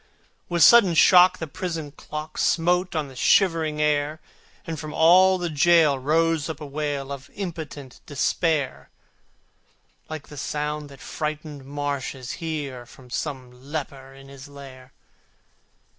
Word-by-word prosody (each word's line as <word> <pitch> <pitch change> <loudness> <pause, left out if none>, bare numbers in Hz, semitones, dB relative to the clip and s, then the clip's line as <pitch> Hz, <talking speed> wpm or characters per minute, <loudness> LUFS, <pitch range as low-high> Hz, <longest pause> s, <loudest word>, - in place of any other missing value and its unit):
With 170 -2 +3
sudden 200 -4 +7
shock 180 +2 +6
the 160 - -4
prison 160 -1 -5
clock 150 +1 -8
Smote 180 +2 +1
on 155 -2 -1
the 135 - -13
shivering 160 0 +2
air, 150 0 0 0.5
And 160 -2 -5
from 155 0 -7
all 185 +3 +6
the 175 -1 -3
gaol 155 -2 +4
rose 160 +2 +1
up 155 -2 -5
a 150 - -7
wail 140 -1 -4
Of 140 -1 -8
impotent 160 -8 -7
despair, 145 0 -1 1.2
Like 155 -2 -7
the 150 - -11
sound 150 +1 -3
the 140 - -13
frightened 150 -2 -6
marshes 140 -2 -4
hear 145 -7 -5
From 125 -1 -17
some 130 -3 -4
leper 135 +1 -7
in 135 0 -14
his 140 +1 -12
lair. 135 -2 -13
150 Hz, 135 wpm, -24 LUFS, 140-165 Hz, 1.2 s, sudden